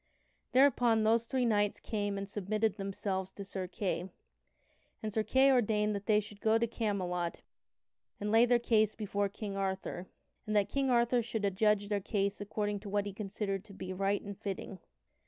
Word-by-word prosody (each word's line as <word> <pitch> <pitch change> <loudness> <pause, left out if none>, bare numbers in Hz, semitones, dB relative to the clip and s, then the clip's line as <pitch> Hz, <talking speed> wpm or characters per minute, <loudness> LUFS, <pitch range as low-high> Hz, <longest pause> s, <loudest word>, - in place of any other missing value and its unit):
Thereupon 245 -4 +4
those 225 +1 +3
three 260 -1 +1
knights 205 -3 +2
came 205 -2 -2
and 195 0 -4
submitted 210 +1 0
themselves 195 -1 -3
to 200 - -7
Sir 190 -1 -4
Kay, 185 -1 -2 0.9
and 215 -1 -3
Sir 220 - +2
Kay 265 +5 +4
ordained 215 -4 +2
that 200 0 -5
they 210 -1 +5
should 205 -1 -9
go 220 0 +4
to 230 - +2
Camelot 185 -7 -2 0.8
and 210 0 -2
lay 230 +2 +6
their 245 0 +5
case 220 -3 +2
before 205 -2 -1
King 200 0 -6
Arthur, 190 -2 -3 0.4
and 215 - -1
that 205 -1 +3
King 275 -1 0
Arthur 240 0 +3
should 225 -2 -3
adjudge 205 +1 +2
their 205 -1 0
case 200 0 -1
according 205 0 -2
to 205 - -8
what 205 0 0
he 200 - -5
considered 195 -1 -3
to 205 - -13
be 185 -1 -6
right 195 +2 0
and 200 -1 -8
fitting. 195 -2 -5
205 Hz, 180 wpm, -32 LUFS, 195-220 Hz, 0.9 s, lay